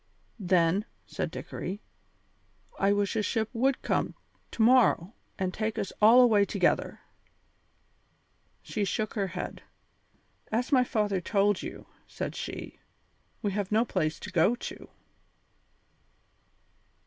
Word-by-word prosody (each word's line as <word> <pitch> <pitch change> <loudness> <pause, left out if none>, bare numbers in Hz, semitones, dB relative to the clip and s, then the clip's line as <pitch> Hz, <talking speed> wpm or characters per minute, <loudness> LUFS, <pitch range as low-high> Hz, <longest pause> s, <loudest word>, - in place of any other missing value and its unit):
"Then," 180 +1 +2 0.2
said - - -3
Dickory, 190 +3 -6 1.0
"I 195 +1 +3
wish 205 +1 0
a 220 - +2
ship 220 +1 -1
would 260 +3 +1
come - - 0 0.3
to 225 - 0
morrow 230 -6 +4 0.2
and 185 -1 -2
take 215 0 -2
us 195 - -3
all 230 +4 +8
away 220 -5 +5
together." - - 0 1.6
She 210 - -2
shook 215 +2 -2
her 200 -3 -1
head. 180 0 -6 0.9
"As 235 +3 -1
my 255 -3 +5
father 210 -5 0
told 200 +1 +1
you," - - -8 0.2
said - - -5
she, - - -6 0.6
"we 205 - 0
have 200 0 -3
no 220 +3 +3
place 155 -7 -1
to 205 - -7
go 185 +6 +3
to." - - -8
205 Hz, 125 wpm, -28 LUFS, 190-225 Hz, 1.6 s, all